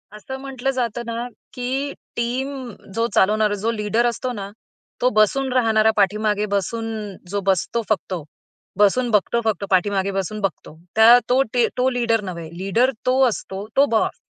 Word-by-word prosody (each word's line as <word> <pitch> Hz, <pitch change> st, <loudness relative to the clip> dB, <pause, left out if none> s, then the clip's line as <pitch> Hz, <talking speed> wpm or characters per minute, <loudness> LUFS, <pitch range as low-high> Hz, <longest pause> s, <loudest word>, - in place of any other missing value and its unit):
असं 265 Hz, +5 st, -7 dB
म्हटलं 270 Hz, -1 st, -3 dB
जातं 240 Hz, -3 st, -2 dB
ना, 235 Hz, +1 st, -4 dB, 0.3 s
की 265 Hz, +3 st, -2 dB, 0.2 s
टीम 245 Hz, +3 st, -1 dB, 0.5 s
जो 230 Hz, 0 st, +1 dB
चालवणारा 210 Hz, +1 st, +3 dB
जो 230 Hz, -, +2 dB
लीडर 220 Hz, +2 st, 0 dB
असतो 240 Hz, +2 st, -1 dB
ना, 200 Hz, -3 st, -6 dB, 0.5 s
तो 250 Hz, -, +4 dB
बसून 260 Hz, +5 st, +3 dB
राहणारा, 220 Hz, -3 st, +4 dB
पाठीमागे 210 Hz, +1 st, +2 dB
बसून 225 Hz, +3 st, -1 dB, 0.4 s
जो 200 Hz, +2 st, -1 dB
बसतो 195 Hz, +5 st, +1 dB
फक्त. 185 Hz, -5 st, -1 dB, 0.5 s
बसून 220 Hz, +5 st, +3 dB
बघतो 215 Hz, +2 st, +2 dB
फक्त, 215 Hz, -2 st, 0 dB
पाठीमागे 195 Hz, +1 st, +1 dB
बसून 195 Hz, +2 st, -3 dB
बघतो. 190 Hz, -5 st, -4 dB, 0.2 s
त्या 225 Hz, +2 st, +8 dB
तो 255 Hz, +2 st, +4 dB
टी 240 Hz, -2 st, +3 dB
तो 255 Hz, +1 st, +3 dB
लीडर 235 Hz, -3 st, +1 dB
नव्हे, 170 Hz, -4 st, -6 dB
लीडर 220 Hz, +8 st, +2 dB
तो 255 Hz, +1 st, +3 dB
असतो 200 Hz, -3 st, -4 dB
तो 280 Hz, +1 st, +6 dB
बॉस. 220 Hz, -, 0 dB
225 Hz, 155 wpm, -21 LUFS, 205-245 Hz, 0.5 s, त्या